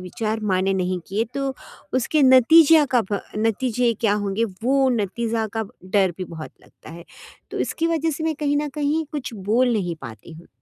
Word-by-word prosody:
विचार 215 +4 -3
माइने 190 +1 +1
नहीं 185 -1 -1
किए, 210 +4 0
तो 275 -1 -2 0.4
उसके 275 +4 +1
नतीजया 295 +4 +7
का 245 - +5
ब 200 - 0 0.2
नतीजे 235 +2 +1
क्या 215 -3 +2
होंगे? 205 +1 -1
वो 255 +7 0
नतीजा 225 +1 -1
का 220 - 0 0.2
डर 190 -1 +1
भी 185 - -3
बहुत 160 -3 -9
लगता - - -16
है। 170 +1 -11 0.5
तो - - -4
इसकी 330 - -1
वजह 325 -1 0
से 315 +1 -4
मैं 320 -1 0
कहीं 290 -1 +1
न 295 0 -2
कहीं 300 +2 0
कुछ 285 -5 -5
बोल 225 +6 +1
नहीं 175 -6 -2
पाती 115 +8 -10
हूँ। 165 +2 -14
225 Hz, 185 wpm, -22 LUFS, 195-275 Hz, 0.5 s, नतीजया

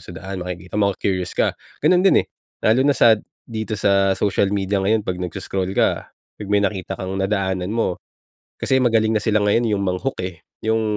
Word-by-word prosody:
sa 90 - -11
daan, 95 +1 -6
makikita 90 +2 -5
mo, 100 - +4
maku-curious 90 -2 -2
ka. - - +2 0.3
Gano’n 180 -1 +5
din - - +5
eh, - - -31 0.4
lalo 110 +4 +4
na 145 - +4
sa 110 -2 +6 0.3
dito 110 -1 -4
sa 100 -1 +3
social 100 0 +1
media 100 0 0
ngayon 105 +3 +2
'pag 90 0 -3
nagse-scroll 95 +1 -3
ka, - - +1
‘pag 105 - -13
may 100 0 +3
nakita 95 -1 -2
kang 95 0 -5
nadaanan 95 -2 -1
mo, 110 -5 -1 0.6
kasi 130 - +1
magaling 115 -3 +3
na - - 0
sila 105 0 +1
ngayon 115 +3 +2
'yong 100 - -2
mang-hook 95 +8 -2
eh, 90 -2 -7 0.2
‘yong 110 0 +1
100 Hz, 190 wpm, -21 LUFS, 95-110 Hz, 0.6 s, sa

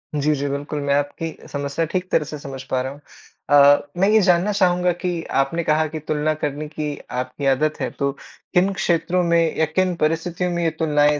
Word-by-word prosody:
जी, 150 +1 +2
जी, 140 +1 -2
बिल्कुल 145 +1 -3
मैं 140 - +3
आपकी 145 +3 -2 0.2
समस्या 140 +3 -2
ठीक 185 0 -2
तरह 155 - +3
से 150 - -5
समझ 135 -2 -7
पा 130 -1 +1
रहा 130 +1 -4
हूँ। 145 - -12 0.5
अ, 145 0 +6
मैं 195 +2 +3
ये 220 0 +5
जानना 180 +2 +3
चाहूँगा 180 -2 +2
कि 175 -2 -1 0.2
आपने 165 +5 -2
कहा 155 +1 +2
कि 155 +1 -6
तुलना 155 +1 -1
करने 150 +1 -2
की 150 -1 -4 0.2
आपकी 130 +2 -6
आदत 155 +2 -1
है, - - -1
तो 140 -1 -1 0.4
किन 185 +3 +3
क्षेत्रों 180 -1 +1
में 170 -1 +2
या 160 - +3
किन 180 +3 0
परिस्थितियों 170 +3 0
में 170 0 -1
ये 165 - +3
तुलनाएँ 150 -2 +3
155 Hz, 205 wpm, -21 LUFS, 145-175 Hz, 0.5 s, अ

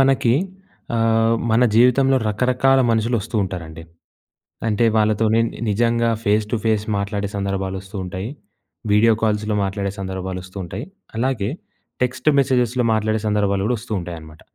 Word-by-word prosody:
మనకి 135 -3 +3 0.6
ఆహ్, 115 0 +3 0.2
మన 115 +3 +4
జీవితంలో 125 +3 +4
రకరకాల 125 +5 +2
మనుషులు 115 +2 +1
వస్తూ 115 +3 -10
ఉంటారండి. 85 -4 -6 0.9
అంటే 110 +2 +1
వాళ్ళతోనే 110 +1 +2
ని - - -11
నిజంగా 115 +2 +2
ఫేస్ 105 -1 +2
టు - - +2
ఫేస్ 110 -2 +1
మాట్లాడే 100 0 -2
సందర్భాలు 95 -1 -2
వస్తూ 95 +2 -10
ఉంటాయి, 95 +3 -5 0.6
వీడియో 110 +2 +5
కాల్స్‌లో 105 -1 0
మాట్లాడే 100 0 -2
సందర్భాలు 95 -1 -4
వస్తూ 95 +1 -14
ఉంటాయి. 85 - -6 0.3
అలాగే 115 -4 0 0.5
టెక్స్ట్ 125 +3 0
మెసేజెస్‍లో 125 -2 +2
మాట్లాడే 110 0 0
సందర్భాలు 100 -2 +1
గూడా 125 +2 +1
వస్తూ 110 - -9
ఉంటాయనమాట. 80 -3 -9
110 Hz, 135 wpm, -21 LUFS, 100-115 Hz, 0.9 s, వీడియో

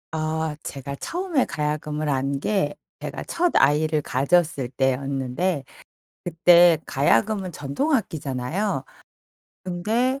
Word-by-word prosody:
아 155 0 -1
제가 140 0 -6
처음에 345 - -1
가야금을 150 0 -2
안 135 0 0
게 170 -5 0 0.2
제가 - - -6
첫아이를 155 - +2
가졌을 140 -1 +1
때였는데 135 +4 -1 0.6
그때 175 0 +6
가야금은 150 - +1
전통 145 - -2
악기잖아요. 160 - -1 0.8
근데 225 +9 0
155 Hz, 235 characters per minute, -24 LUFS, 140-185 Hz, 0.8 s, 그때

